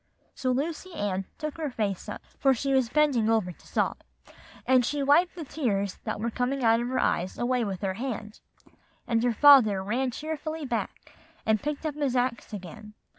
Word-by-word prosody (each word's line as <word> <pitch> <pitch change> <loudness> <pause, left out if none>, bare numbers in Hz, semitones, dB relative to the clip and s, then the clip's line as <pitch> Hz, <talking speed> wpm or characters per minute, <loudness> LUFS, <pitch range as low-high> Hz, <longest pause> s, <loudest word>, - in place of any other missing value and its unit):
So 255 - -2
Lucy 320 +7 -2
Ann 195 -2 -2
took 305 -1 -5
her 310 -3 -2
face 210 -6 -3
up, - - -7 0.2
for 270 -2 +4
she 275 +3 -1
was 260 -3 +2
bending 270 -6 +2
over 220 -5 +2
to - - -18
sob, - - 0 0.7
and 255 -1 +4
she 285 +3 -1
wiped 315 +7 +4
the 330 -4 -6
tears 200 -10 -2
that - - -3
were 230 +2 -2
coming 255 +3 -1
out 225 0 +5
of 240 - -2
her 255 +1 -2
eyes 185 -6 0
away 245 0 +1
with 195 -4 -4
her 195 -2 -1
hand; 220 -1 -5 0.7
and 230 -1 +1
her 245 - +3
father 230 -6 +6
ran 245 +6 0
cheerfully 310 +3 -5
back, 235 -3 -4 0.3
and 220 -1 +2
picked 300 +1 -4
up 310 - -1
his 285 -3 -1
axe 245 -2 -1
again. 210 +2 -9
245 Hz, 190 wpm, -27 LUFS, 215-285 Hz, 0.7 s, father